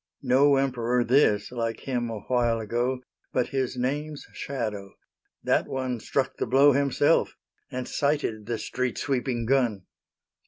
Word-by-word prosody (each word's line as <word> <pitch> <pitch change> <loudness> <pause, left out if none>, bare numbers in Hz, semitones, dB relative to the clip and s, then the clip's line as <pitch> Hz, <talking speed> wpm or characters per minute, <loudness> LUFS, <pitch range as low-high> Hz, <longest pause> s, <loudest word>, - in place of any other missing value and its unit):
No 135 +2 +5
Emperor, 125 -3 +1
this, 120 -5 +3
like 115 -2 -3
him 120 -3 -2
awhile 115 +1 0
ago, 120 +4 -1 0.3
But 125 - +1
his 130 -2 -2
Name's 145 +4 -2
shadow; 105 -8 -4 0.5
that - - +2
one 130 -2 -2
struck 130 +4 -1
the - - -2
blow 135 +4 +6
Himself, 140 +3 +2 0.3
and 125 0 -4
sighted 140 -8 -1
the 115 -1 -1
street 125 +2 -3
sweeping 125 -3 -1
gun! 120 -6 +1
125 Hz, 130 wpm, -26 LUFS, 115-135 Hz, 0.5 s, blow